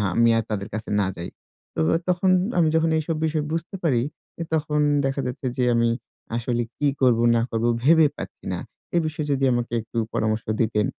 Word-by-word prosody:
আমি 115 Hz, 0 st, +5 dB
আর 115 Hz, -, +1 dB
তাদের 100 Hz, -1 st, -3 dB
কাছে 110 Hz, 0 st, -5 dB
না 95 Hz, -, +2 dB
যাই। 85 Hz, 0 st, -6 dB, 0.5 s
তো -, -, -3 dB, 0.2 s
আ -, -, +4 dB
তখন 180 Hz, +1 st, +2 dB, 0.3 s
আমি 165 Hz, -2 st, +4 dB
যখন 160 Hz, 0 st, +3 dB
এইসব 160 Hz, +1 st, -1 dB
বিষয় 155 Hz, -1 st, 0 dB
বুঝতে 165 Hz, +3 st, -3 dB
পারি, 125 Hz, -8 st, +2 dB, 0.4 s
এ -, -, 0 dB
তখন 150 Hz, -1 st, +1 dB, 0.3 s
দেখা 135 Hz, +1 st, -1 dB
যাচ্ছে 125 Hz, +1 st, -4 dB
যে, 125 Hz, -, +2 dB
আমি 115 Hz, 0 st, +3 dB, 0.5 s
আসলে 120 Hz, 0 st, -1 dB, 0.2 s
কি 145 Hz, -, +1 dB
করবো 120 Hz, -2 st, +4 dB
না 115 Hz, -, +3 dB
করবো, 115 Hz, +1 st, 0 dB
ভেবে 160 Hz, +1 st, +6 dB
পাচ্ছি -, -, -9 dB
না। -, -, -3 dB, 0.4 s
এ -, -, +4 dB
বিষয়ে 155 Hz, -1 st, -3 dB
যদি 135 Hz, -1 st, +2 dB
আমাকে 120 Hz, 0 st, -2 dB
একটু 115 Hz, +1 st, -9 dB, 0.2 s
পরামর্শ 110 Hz, 0 st, 0 dB, 0.2 s
দিতেন। 110 Hz, -2 st, +1 dB
125 Hz, 195 wpm, -24 LUFS, 115-155 Hz, 0.5 s, ভেবে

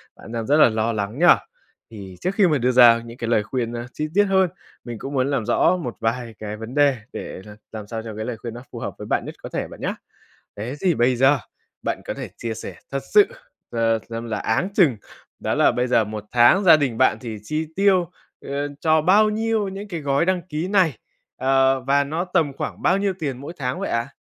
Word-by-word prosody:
Bạn 115 Hz, -, -12 dB
đang 115 Hz, -2 st, -3 dB
rất 145 Hz, +2 st, +4 dB
là 150 Hz, -, +7 dB
lo 110 Hz, +1 st, -1 dB
lắng 105 Hz, +6 st, -3 dB
nhỉ? 175 Hz, -, +4 dB, 0.7 s
Thì 95 Hz, -4 st, -9 dB
trước 185 Hz, +2 st, -1 dB
khi 200 Hz, -4 st, +5 dB
mà 150 Hz, -3 st, +2 dB
đưa 125 Hz, 0 st, +1 dB
ra 120 Hz, -2 st, +7 dB
những 115 Hz, +1 st, -10 dB
cái 115 Hz, -, -4 dB
lời 110 Hz, -3 st, +2 dB
khuyên 120 Hz, 0 st, -3 dB, 0.2 s
chi 155 Hz, -, -3 dB
tiết 205 Hz, +1 st, +5 dB
hơn, 190 Hz, -2 st, +3 dB, 0.3 s
mình 120 Hz, -2 st, -7 dB
cũng 140 Hz, +1 st, -6 dB
muốn 130 Hz, +1 st, +1 dB
làm 130 Hz, -6 st, -1 dB
rõ 150 Hz, +9 st, +3 dB
một 125 Hz, -9 st, -5 dB
vài 115 Hz, 0 st, -2 dB
cái 105 Hz, 0 st, -5 dB
vấn 115 Hz, +5 st, -8 dB
đề 140 Hz, -3 st, +4 dB, 0.2 s
để -, -, -7 dB
là 105 Hz, 0 st, -11 dB, 0.2 s
làm 105 Hz, -2 st, -7 dB
sao 115 Hz, 0 st, -5 dB
cho 110 Hz, -2 st, -7 dB
cái 110 Hz, 0 st, -4 dB
lời 120 Hz, -3 st, -4 dB
khuyên 115 Hz, 0 st, -7 dB
nó 120 Hz, +2 st, -9 dB
phù -, -, -7 dB
hợp -, -, -5 dB
với -, -, -8 dB
bạn -, -, 0 dB
nhất -, -, -7 dB
có -, -, -6 dB
thể -, -, -3 dB
bạn -, -, -12 dB
nhá. -, -, -2 dB, 0.6 s
Thế 115 Hz, +6 st, -5 dB
thì 180 Hz, -4 st, +2 dB
bây 120 Hz, +1 st, +2 dB
giờ 135 Hz, +3 st, +4 dB, 0.4 s
bạn -, -, -2 dB
có -, -, -4 dB
thể -, -, -6 dB
chia 115 Hz, -1 st, -4 dB
sẻ -, -, -7 dB, 0.2 s
thật 135 Hz, -, -2 dB
sự, 410 Hz, -1 st, +8 dB, 0.4 s
à, 115 Hz, -1 st, +1 dB, 0.2 s
xem 115 Hz, +1 st, -5 dB
là 110 Hz, -3 st, -3 dB
áng 115 Hz, -, 0 dB
chừng 150 Hz, -, +4 dB, 0.4 s
đó -, -, -1 dB
là -, -, +4 dB
bây 125 Hz, +1 st, 0 dB
giờ 115 Hz, -3 st, +3 dB
một 105 Hz, 0 st, -6 dB
tháng 125 Hz, +12 st, +5 dB
gia 165 Hz, -3 st, +8 dB
đình 130 Hz, -6 st, -1 dB
bạn 130 Hz, -, +3 dB
thì 115 Hz, -4 st, -6 dB
chi 155 Hz, +7 st, -3 dB
tiêu, 190 Hz, -3 st, +3 dB, 0.3 s
ờ, 140 Hz, +1 st, -3 dB
cho 155 Hz, -1 st, +3 dB
bao 210 Hz, +5 st, +5 dB
nhiêu 220 Hz, -1 st, 0 dB
những 200 Hz, +2 st, -7 dB
cái 170 Hz, -4 st, -4 dB
gói 140 Hz, +2 st, +1 dB
đăng 185 Hz, -2 st, +1 dB
ký 160 Hz, +4 st, -3 dB
này? 180 Hz, -, +2 dB, 0.4 s
Ờ, 135 Hz, 0 st, +3 dB
và 140 Hz, +2 st, +2 dB
nó 160 Hz, +5 st, -2 dB
tầm 170 Hz, -6 st, 0 dB
khoảng -, -, -6 dB
bao 190 Hz, +2 st, +3 dB
nhiêu 200 Hz, -1 st, 0 dB
tiền 140 Hz, -6 st, -3 dB
mỗi 145 Hz, +5 st, -7 dB
tháng 125 Hz, -1 st, -3 dB
vậy -, -, -3 dB
ạ? 115 Hz, +3 st, -1 dB
130 Hz, 245 wpm, -22 LUFS, 115-165 Hz, 0.7 s, sự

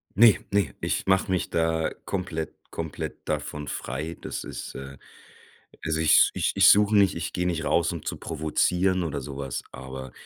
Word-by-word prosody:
Ne, 110 Hz, +1 st, +8 dB, 0.2 s
ne, 100 Hz, -8 st, +1 dB
ich -, -, -1 dB
mache 95 Hz, +1 st, +2 dB
mich 95 Hz, -, 0 dB
da 80 Hz, -1 st, +1 dB
komplett 90 Hz, -4 st, -3 dB, 0.2 s
komplett -, -, -6 dB
davon 75 Hz, -1 st, -3 dB
frei. 75 Hz, +6 st, -4 dB
Das -, -, -5 dB
ist -, -, -7 dB
äh, 70 Hz, 0 st, -8 dB, 0.9 s
also 80 Hz, 0 st, 0 dB
ich 80 Hz, -1 st, +6 dB
ich -, -, 0 dB
ich -, -, +7 dB
suche 105 Hz, +1 st, +5 dB
nicht 100 Hz, -2 st, +5 dB
ich 85 Hz, +1 st, -4 dB
geh 90 Hz, -, -1 dB
nicht 85 Hz, -3 st, -1 dB
raus, 85 Hz, +2 st, +2 dB
um 85 Hz, -3 st, -6 dB
zu -, -, -3 dB
provozieren 90 Hz, +4 st, +1 dB
oder 75 Hz, -4 st, -3 dB
so 70 Hz, 0 st, -7 dB
was, 70 Hz, -3 st, -4 dB
aber 65 Hz, -1 st, -8 dB
80 Hz, 175 wpm, -26 LUFS, 75-90 Hz, 0.9 s, Ne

